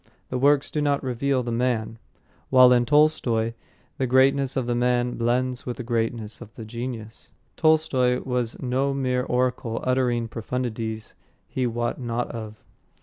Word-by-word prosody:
The 125 - -2
works 140 +1 +3
do 150 - -1
not 145 -1 +1
reveal 130 +1 0
the 120 - -3
man; 115 -2 -1 0.5
while 130 -1 +7
in 120 -1 +2
Tolstoy 120 -6 +3 0.5
the 130 - +1
greatness 135 +2 +3
of 130 - 0
the 120 - 0
man 125 0 +1
blends 125 +2 -1
with 120 -2 -3
the 125 - -5
greatness 115 -2 -2
of 115 -3 -10
the 115 - -8
genius. 115 -1 -7 0.2
Tolstoy 155 -6 +3
was 125 -3 -2
no 135 +2 0
mere 130 -2 0
oracle 125 -2 -1
uttering 125 -2 +1
profundities 115 -1 -4 0.3
he 130 -1 -1
wot 120 +2 -2
not 120 0 -2
of. 110 -2 -8
125 Hz, 150 wpm, -24 LUFS, 115-130 Hz, 0.5 s, while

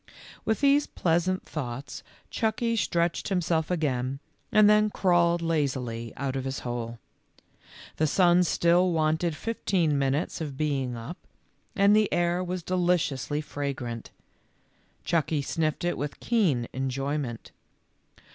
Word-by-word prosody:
With 220 - 0
these 285 +1 +4
pleasant 175 +2 0
thoughts 135 -2 -6 0.3
Chucky 230 +1 0
stretched 170 -5 0
himself 170 -4 0
again 135 -6 -1 0.3
and 215 -2 +6
then 210 0 +5
crawled 175 -3 +2
laz 155 -5 +1
ily 115 -3 -5
out 135 -1 -2
of 135 - -2
his 135 0 -4
hole. 120 -1 -4 1.0
The 155 - +2
sun 175 +2 +4
still 175 +1 +3
wanted 160 +1 +1
fif 230 +8 -5
teen 160 -7 +2
minutes 140 +5 -1
of 145 -4 -5
being 135 -5 -1
up, 125 +11 -7 0.6
and 200 0 +5
the 215 -1 +3
air 175 +1 +1
was 180 -1 -4
deliciously 170 -6 0
fragrant. 135 -6 -5 1.0
Chucky 160 -3 +1
sniffed 155 +2 -1
it 175 - -1
with 145 0 -4
keen 170 - +1
enjoyment. 135 -1 -3
160 Hz, 130 wpm, -27 LUFS, 135-180 Hz, 1.0 s, and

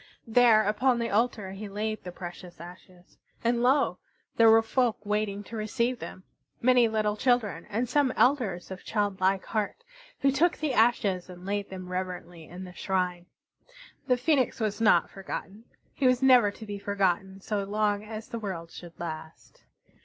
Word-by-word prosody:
There 230 -2 +5
upon 230 +5 +2
the 235 0 -2
altar 210 -2 0
he 200 +2 -7
laid 215 +2 -3
the 180 - -6
precious 175 -1 -9
ashes. 180 +1 -14 0.2
And 235 0 +1
lo! 265 +3 +2 0.4
There 230 -1 +6
were 225 0 +6
folk 240 0 +1
waiting 205 -1 -1
to 230 - -9
receive 235 +3 -1
them, 185 - -8 0.4
many 250 -1 +5
little 215 -1 0
children, 245 -2 0
and 230 +4 -1
some 270 +1 +2
elders 220 -11 +1
of 185 - -8
childlike 195 -2 0
heart, 215 - -3 0.4
who 275 - +4
took 330 +6 +2
the 305 -4 -1
ashes 215 -6 +2
and 180 0 -11
laid 200 0 -2
them 185 -1 -8
reverently 180 -2 -5
in 180 +4 -9
the 180 -1 -10
shrine. 180 -2 -2 0.8
The 250 -2 +3
Phoenix 265 0 +1
was 215 -1 -2
not 220 - +4
forgotten; 195 +2 -7 0.3
he 270 - +1
was 255 +1 +2
never 250 -5 +6
to 220 +2 -10
be 205 -1 -6
forgotten 195 -1 -1
so 200 +1 -2
long 205 0 0
as 215 0 -7
the 230 - -5
world 175 -6 -5
should 175 -2 -12
last. 160 -1 -8
210 Hz, 170 wpm, -28 LUFS, 190-235 Hz, 0.8 s, There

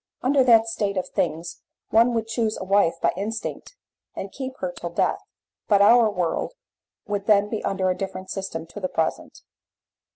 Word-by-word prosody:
Under 265 +1 +4
that 230 -2 +6
state 205 -3 -2
of 185 - -2
things 165 +2 -2 0.3
one 235 +2 +4
would 225 -1 0
choose 225 -1 -1
a - - -5
wife 195 -2 +3
by - - +4
instinct 220 - -5 0.4
and 195 - -6
keep 265 -1 -6
to - - -27
her 185 - -1
till 175 0 -6
death, 170 - 0 0.5
but 205 -2 +4
our 230 +2 +6
world 180 - -2 0.5
would 205 -2 -3
then 205 -1 +4
be 220 - -3
under 190 -1 0
a - - -1
different 190 -1 -6
system 190 -4 -4
to 170 - -10
the 185 -2 -2
present. 160 -1 -3
200 Hz, 185 wpm, -24 LUFS, 185-225 Hz, 0.5 s, that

